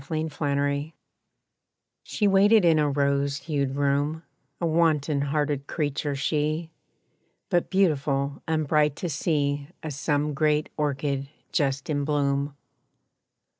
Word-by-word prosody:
=Transformation= 145 -1 -1 1.1
She 210 - 0
waited 200 +1 +5
in 160 -2 +5
a 150 -1 +2
rose 140 0 +1
hued 140 -4 -2
room; 145 +3 0 0.4
A 170 - -1
wanton 155 -3 +2
hearted 145 -1 -1
creature 145 -2 -2
she, 155 +3 -1 0.8
But 175 -2 +1
beautiful 140 -7 +1
and 155 -2 0
bright 150 -1 +3
to 175 - -4
see 145 -2 0 0.2
As 155 -3 -4
some 145 +1 0
great 150 +1 +1
orchid 140 -2 -1 0.2
just 140 -2 0
in 145 -2 -1
bloom. 140 -1 0
145 Hz, 115 wpm, -26 LUFS, 140-155 Hz, 1.1 s, waited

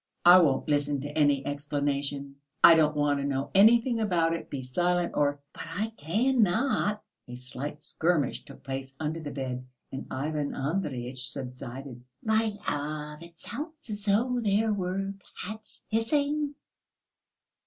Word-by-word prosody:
"I 175 +1 +10
won't 145 -6 +2
listen 145 -1 +1
to 145 +1 -6
any 145 -3 +3
explanation. 145 -1 -2 0.3
I 170 - +11
don't 155 -2 +4
want 145 -1 +2
to - - -2
know 140 0 -2
anything 230 +4 +5
about 175 -6 +2
it. 165 - -5
Be 135 -2 -4
silent 175 +7 +1
or...." 145 -1 +2
"But - - -7
I 190 +7 -2
cannot...." 220 - +1 0.2
A 125 - -7
slight 135 +4 -6
skirmish 160 -6 0
took - - -14
place 135 0 -5
under 160 +1 -2
the 155 -2 -5
bed, 130 -2 -4 0.3
and 135 - -6
Ivan 145 +1 -2
Andreyitch 130 -5 -3
subsided. 125 -1 -7 0.2
"My 220 0 +2 0.2
love, 150 +1 -3
it 170 0 -13
sounds 305 0 -7
as 205 -1 -4
though 240 +5 +2
there 215 +1 +2
were 195 0 -2 0.3
cats 215 +2 -9
hissing." 285 +6 +1
155 Hz, 145 wpm, -28 LUFS, 140-205 Hz, 0.3 s, I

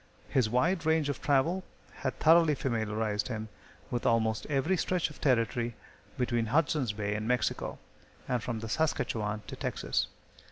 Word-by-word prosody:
His 125 -5 +2
wide 160 - +2
range 160 -2 +2
of 145 - -3
travel 155 +7 +2 0.3
had 130 - -3
thoroughly 160 -1 +5
familiarized 110 -4 -1
him 110 -3 -4 0.4
with 120 - -1
almost 110 -1 +1
every 150 +6 +1
stretch 180 -2 0
of - - -15
territory 120 -2 +1 0.4
between 120 -2 0
Hudson's 145 -2 +2
Bay 105 -1 -2
and 105 +1 -3
Mexico, 125 0 0 0.5
and 125 -2 0
from 110 0 -3
the 115 - -4
Saskatchewan 110 -7 -1
to - - -7
Texas. - - -1
125 Hz, 150 wpm, -30 LUFS, 110-150 Hz, 0.5 s, thoroughly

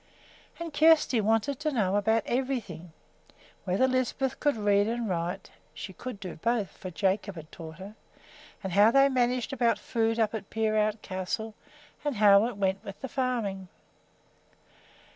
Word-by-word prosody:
And 335 -2 -6
Kjersti 305 -6 +4
wanted 225 +6 +1
to 305 0 -1
know 205 -7 +1
about 220 +2 +2
everything, 235 - -3 0.7
whether 195 +8 +2
Lisbeth 260 +1 -1
could 290 -3 +2
read 205 -1 +3
and 235 0 -2
write 180 +1 -3 0.2
(she 200 -2 -7
could 250 +1 -7
do 185 -5 -7
both, 225 +2 0
for 185 - -7
Jacob 195 +2 -1
had 160 -2 -10
taught 160 0 -10
her), 195 +2 -9 0.7
and 190 -2 -4
how 205 +3 +6
they 275 +3 +5
managed 250 0 0
about 240 -3 +2
food 225 0 -1
up 220 -1 +1
at 215 -3 -6
Peerout 215 -1 0
Castle, 190 +4 -4 0.5
and 290 -3 -1
how 205 0 +6
it 240 -4 -6
went 195 -1 0
with 200 -1 -9
the 265 - -5
farming. 230 -8 -2
215 Hz, 155 wpm, -28 LUFS, 195-250 Hz, 0.7 s, how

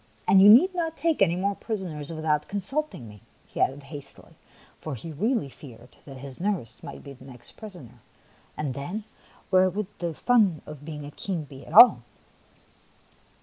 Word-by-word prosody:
And 190 - +6
you 200 - +9
need 290 - +7
not 330 -3 -2
take 320 -2 0
any 175 -3 +4
more 200 +3 0
prisoners 185 -10 -5
without 155 -2 -1
consulting 205 - -4
me," 105 -1 -14 0.2
he - - -6
added 140 +2 0
hastily, 140 -1 -10 0.5
for 155 -3 -5
he 160 +8 -8
really 215 - 0
feared 125 -3 -14
that 135 -2 -10
his 135 0 -10
nurse 185 - -3
might - - -9
be 140 - -9
the 130 0 -16
next 125 -3 -7
prisoner, 140 - -12 0.6
and 145 -4 -2
then, 175 - -5 0.5
where 185 0 +5
would 205 +2 -5
be 175 - -2
the 165 - -4
fun 210 - +2
of 150 -2 -10
being 150 -2 -7
a 145 - -9
king 170 -1 -4 0.2
at - - -10
all 225 - +9
165 Hz, 175 wpm, -26 LUFS, 140-205 Hz, 0.6 s, you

